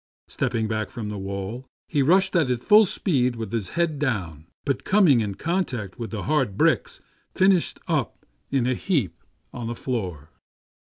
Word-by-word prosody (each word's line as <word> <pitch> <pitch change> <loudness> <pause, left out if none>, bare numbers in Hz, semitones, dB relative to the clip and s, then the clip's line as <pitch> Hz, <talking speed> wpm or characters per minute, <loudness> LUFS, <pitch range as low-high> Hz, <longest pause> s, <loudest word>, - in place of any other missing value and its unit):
Step - - -2
ping 110 -1 0
back 110 0 -2
from 110 -3 -6
the 105 - -5
wall, 100 +5 -5 0.2
he 145 - +1
rushed 185 +6 +3
at 160 -7 +3
it 125 -1 -1
full 215 +1 +7
speed 130 - 0
with 115 -1 -5
his 115 -5 -2
head 165 -4 +1
down; 90 - -2 0.2
but 135 -2 -1
coming 180 - +4
in 100 -2 -3
contact 130 - -2
with 115 -2 -4
the 105 0 -5
hard 135 -10 0
bricks, - - +1 0.3
finished 190 -2 +3
up - - -2 0.2
in 135 -3 +1
a 130 - +2
heap 125 - -1 0.3
on 120 -2 -5
the 120 - -3
floor. 90 - -4
120 Hz, 175 wpm, -24 LUFS, 105-155 Hz, 0.3 s, full